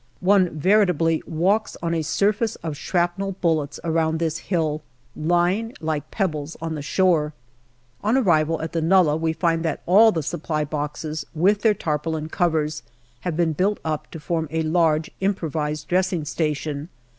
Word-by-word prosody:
One 185 -3 +3
veritably 175 -3 +3
walks 190 +7 0
on 170 0 0
a 165 - 0
surface 205 +7 +1
of 160 -3 -3
shrapnel 175 +5 -1
bullets 155 -4 0
around 160 -1 +1
this 165 0 -1
hill, 155 -4 -1 0.3
lying 175 +8 +1
like 155 -2 -3
pebbles 160 -6 -2
on 165 0 -3
the 150 - -4
shore. 155 -1 +2 0.7
On 220 +5 +3
arrival 165 - +2
at 160 - -4
the 165 - 0
nullah 165 -2 +4
we 160 0 0
find 165 0 0
that 160 -2 -2
all 215 +5 +6
the 160 -5 -2
Supply 150 +1 -2
boxes, 150 +1 -4
with 195 +6 +3
their 220 -2 +4
tarpaulin 155 -1 -2
covers, 155 -3 0 0.4
have 170 0 -3
been 165 -2 +2
built 195 +7 0
up 155 -2 -3
to 165 - -8
form 160 +1 -2
a 160 +1 -1
large 160 -1 +2
impro 190 -5 -1
vised 150 -1 -3
dressing 180 -3 +1
station. 150 0 -2
165 Hz, 160 wpm, -23 LUFS, 155-180 Hz, 0.7 s, all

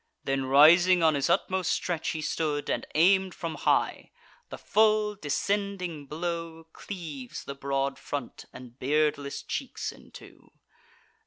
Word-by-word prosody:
Then 135 -1 -1
rising, 170 +6 +6
on 160 -1 +5
his 140 +2 0
utmost 185 +1 +1
stretch 170 -3 -1
he 155 -1 -3
stood, 150 -1 -1
And - - -2
aim'd 190 +3 +4
from 165 -1 -4
high: - - 0 0.4
the - - -7
full 215 -1 +2
descending 185 -2 -2
blow 165 +1 -4
Cleaves 155 -10 -7
the 140 - -6
broad 140 0 -2
front 140 -4 -6
and 125 0 -13
beardless 145 0 0
cheeks - - -4
in - - -17
two. - - -15
160 Hz, 135 wpm, -28 LUFS, 140-180 Hz, 0.4 s, rising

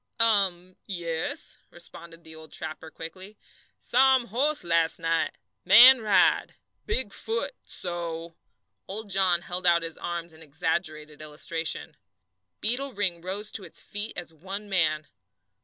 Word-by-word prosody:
"Um, 190 -5 +2
yes," 170 -4 -3
responded 170 -1 -6
the 160 -1 -10
old 160 0 -12
trapper, 160 0 -6
quickly. 185 +6 -10 0.4
"Saw 265 +2 +4
um 245 -2 -1
horse 290 +7 +1
las' 165 -1 +2
night 165 -1 -1 0.3
man 240 +7 +9
ride 210 -3 +3 0.3
big 260 - 0
foot 465 +3 -2
so." 170 -2 -5 0.5
Old 205 +1 -5
John 180 -3 +3
held 180 +1 -1
out 170 -1 +4
his 165 -1 -5
arms 170 -1 -4
in 160 - -16
exaggerated 155 0 -2
illustration. 160 +2 -3 0.6
Beetle 255 +5 +1
Ring 185 -5 0
rose 200 +4 -3
to 200 - 0
its 170 - -5
feet 205 +2 -4
as 175 -2 -6
one 195 +6 -6
man. 155 -5 +1
175 Hz, 135 wpm, -27 LUFS, 165-205 Hz, 0.6 s, man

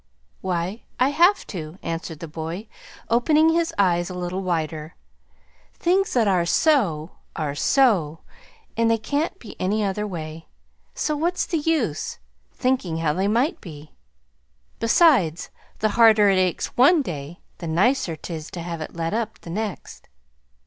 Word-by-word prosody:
"Why, 185 +3 -2 0.2
I 255 - +4
have 345 +7 +3
to," 160 -2 -7
answered 165 -1 -5
the 165 - -5
boy, 165 +6 -6 0.4
opening 305 +7 +4
his 330 0 +1
eyes 175 -2 +2
a 180 - -6
little 180 +1 -3
wider. 160 -3 -3 0.8
"Things 380 +3 +1
that 235 -4 +3
are 185 -3 +3
so 170 - +1 0.2
are 150 -3 -2
SO, 170 - +2 0.5
and 230 0 +2
they 230 - +3
can't 295 - -2
be 225 - -11
any 210 +3 +1
other 205 +1 -1
way. 160 -3 -7 0.5
So 305 - -1
what's 345 +4 0
the 330 - -1
use 290 - -1 0.3
thinking 250 -11 -1
how 160 -2 0
they 190 +4 0
might 260 - +1
be? 155 -3 -11 0.9
Besides, 230 - +3 0.3
the 215 - +1
harder 215 -2 +6
it 190 -1 +3
aches 185 -2 -1
one 290 +5 +5
day, 155 - -6 0.2
the 170 - -5
nicer 175 +2 +1
'tis 155 -1 -7
to 175 - -7
have 170 -2 -5
it 155 - -7
let 165 +2 -2
up 225 0 -3
the 165 - -9
next." 210 +1 -5
190 Hz, 150 wpm, -23 LUFS, 165-250 Hz, 0.9 s, harder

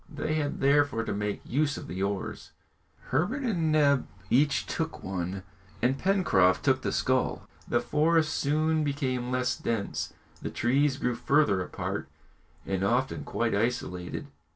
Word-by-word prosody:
They 155 -1 -3
had 150 -2 -1
therefore 140 -4 +3
to - - -3
make 105 0 -3
use 145 +3 0
of - - -7
the 95 - -5
oars, 100 -1 -3 0.6
Herbert 200 - 0
and 170 -10 +1
Neb 140 -3 +3 0.2
each 140 +3 +3
took 160 0 -3
one, 95 0 -3 0.4
and 130 +3 +1
Pencroft 140 - +3
took 130 -1 +3
the - - -1
scull. 130 0 0 0.2
The 120 - +2
forest 155 +5 +2
soon 155 +2 +1
became 130 -4 -1
less 125 0 0
dense, 110 -4 -2 0.3
the - - -3
trees 135 +3 +2
grew 125 -3 0
further 120 -5 +2
apart 90 - -4 0.6
and 95 -1 -1
often 125 +6 +1
quite 120 -1 -1
isolated. 100 - -2
130 Hz, 145 wpm, -28 LUFS, 115-150 Hz, 0.6 s, therefore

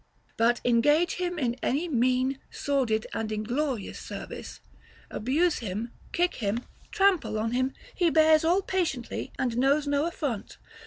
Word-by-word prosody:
But 235 +1 +2
engage 295 +8 +3
him 355 -1 -2
in 245 -5 -1
any 300 +7 0
mean, 255 -1 +1
sordid, 250 -6 0
and 220 -1 -2
inglorious 235 +2 -2
service, - - -8 0.5
abuse 300 +9 +1
him, 220 +2 -4 0.2
kick 355 +1 +1
him, 225 +2 -2 0.2
trample 390 - +2
on 225 +1 -1
him, 255 +2 0 0.2
he 350 -3 +2
bears 315 0 +5
all 355 +4 +3
patiently 325 -12 -2
and 245 -3 -1
knows 280 +3 +3
no 285 +2 +1
affront. 280 -11 -4
270 Hz, 140 wpm, -27 LUFS, 235-320 Hz, 0.5 s, bears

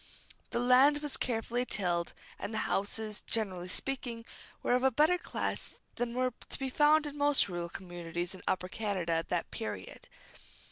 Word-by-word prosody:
The - - -2
land 255 +4 +6
was 295 - -2
carefully 240 0 -1
tilled, 175 -7 0 0.3
and - - -4
the 220 - -2
houses, 210 +1 0
generally 190 -6 +1
speaking, 240 +2 -3 0.4
were - - +2
of 250 - +3
a 265 - +5
better 310 +8 +4
class - - -3 0.2
than 240 0 -2
were 255 -1 +1 0.2
to - - -2
be 265 -1 -3
found 300 +2 +5
in 295 -1 -5
most 290 -1 +4
rural 175 -2 -4
communities 175 -1 -4
in 190 - -10
Upper 185 -1 0
Canada 190 -4 -2
at 165 0 -1
that 175 -2 -1
period. 105 -4 -6
225 Hz, 170 wpm, -32 LUFS, 180-260 Hz, 0.4 s, land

